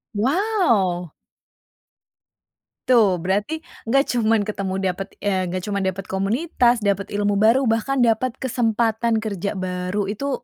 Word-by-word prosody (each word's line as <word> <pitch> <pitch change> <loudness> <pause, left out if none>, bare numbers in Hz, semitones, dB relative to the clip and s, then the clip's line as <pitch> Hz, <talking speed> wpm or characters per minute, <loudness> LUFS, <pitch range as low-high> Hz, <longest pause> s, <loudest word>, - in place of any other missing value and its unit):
Wow. 230 - +1 1.8
Tuh, 225 -7 +5
berarti 205 - -2 0.2
enggak 275 +5 +2
cuman 225 -3 +2
ketemu, 200 -2 -3 0.2
dapet, 195 +2 -8
eee, 190 -2 0
nggak 180 +1 -4
cuman 200 -1 -2
dapet 190 +1 -3
komunitas, 235 - +1
dapet 200 -1 0
ilmu 205 -1 +1
baru, 230 +6 +4
bahkan 245 +3 +1
dapet 235 +2 +1
kesempatan 230 -3 0
kerja 200 -2 -3
baru. 185 +1 -2
Itu 275 +5 -3
215 Hz, 120 wpm, -22 LUFS, 195-240 Hz, 1.8 s, Tuh